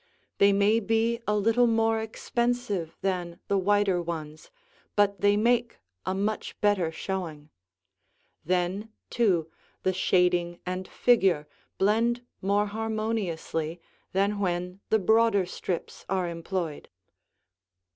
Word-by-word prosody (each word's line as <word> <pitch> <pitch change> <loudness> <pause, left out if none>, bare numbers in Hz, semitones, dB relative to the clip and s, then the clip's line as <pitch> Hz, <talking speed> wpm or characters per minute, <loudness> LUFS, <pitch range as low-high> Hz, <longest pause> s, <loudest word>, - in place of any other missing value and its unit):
They 200 0 +6
may 200 +3 +4
be 225 +2 +1
a 210 - +2
little 225 +4 +3
more 225 -1 +2
expensive 225 -5 -2
than 180 -2 -2
the 200 - +3
wider 200 -2 +2
ones, 160 -2 -6 0.5
but 200 -1 +2
they 205 0 +4
make 235 +2 +2 0.3
a 185 - 0
much 210 +2 -2
better 200 -6 +2
showing. 160 -4 -5 0.9
Then, 185 +5 -1 0.2
too, 180 -9 +2 0.3
the 185 - +2
shading 180 -1 +2
and 185 +1 -3
figure 190 -11 +3 0.3
blend 230 +5 +2 0.2
more 200 +2 +2
harmoniously 210 -7 -2 0.3
than 200 +2 +1
when 180 -1 -2
the 220 - +4
broader 220 -1 +3
strips 180 -1 -5
are 185 -2 0
employed. 170 -2 -4
195 Hz, 115 wpm, -27 LUFS, 175-220 Hz, 0.9 s, They